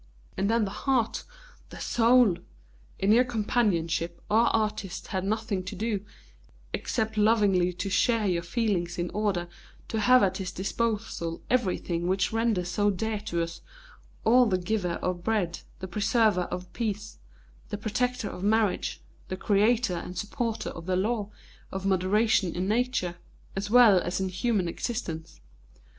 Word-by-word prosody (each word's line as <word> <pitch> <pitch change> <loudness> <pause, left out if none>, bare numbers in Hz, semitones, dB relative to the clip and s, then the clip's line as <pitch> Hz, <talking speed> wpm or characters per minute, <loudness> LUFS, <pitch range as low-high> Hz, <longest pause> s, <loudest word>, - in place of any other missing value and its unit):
And 195 +1 0
then 230 -1 +3
the 195 - -5
heart, 255 -1 0 0.4
the - - -10
soul! 235 -5 +4 0.6
In 195 +2 +2
your 240 +3 +6
companionship 200 -8 0
our 230 +2 +5
artist 210 -4 -1
had 190 -3 -2
nothing 210 -2 -1
to 185 - -5
do 215 -3 -2 0.7
except 220 -2 -2
lovingly 205 -4 +3
to 180 - -4
share 220 +3 +2
your 175 -3 +1
feelings 175 -2 -1
in 175 0 -2
order 200 -5 -1 0.4
to 220 - -1
have 250 +3 +6
at 190 - +1
his 190 -3 -4
disposal 205 -4 -2
everything 180 -7 0
which 190 +3 +1
renders 225 -6 +1
so 205 +3 +2
dear 215 +2 -1
to 170 -5 -2
us 165 0 -7 0.6
all 245 +2 +5
the 190 -3 +2
giver 180 -1 -1
of 180 -1 -2
bread, 195 -5 0 0.2
the 190 - -4
preserver 210 -1 +2
of 180 0 -6
peace, 215 -2 -4 0.5
the 205 - -3
protector 225 +2 -1
of 180 - -7
marriage, 210 -1 +1 0.3
the 185 - -4
creator 215 +2 +2
and 175 +1 -5
supporter 225 +2 -2
of 165 +1 -9
the 185 - +1
law 210 +2 0 0.4
of 190 0 -4
moderation 195 0 +2
in 180 +2 -1
Nature, 220 -6 0 0.4
as 200 +1 -3
well 225 -5 +7
as 175 +2 -2
in 190 -1 -1
human 195 0 0
existence. 165 -5 -4
205 Hz, 150 wpm, -27 LUFS, 180-225 Hz, 0.7 s, well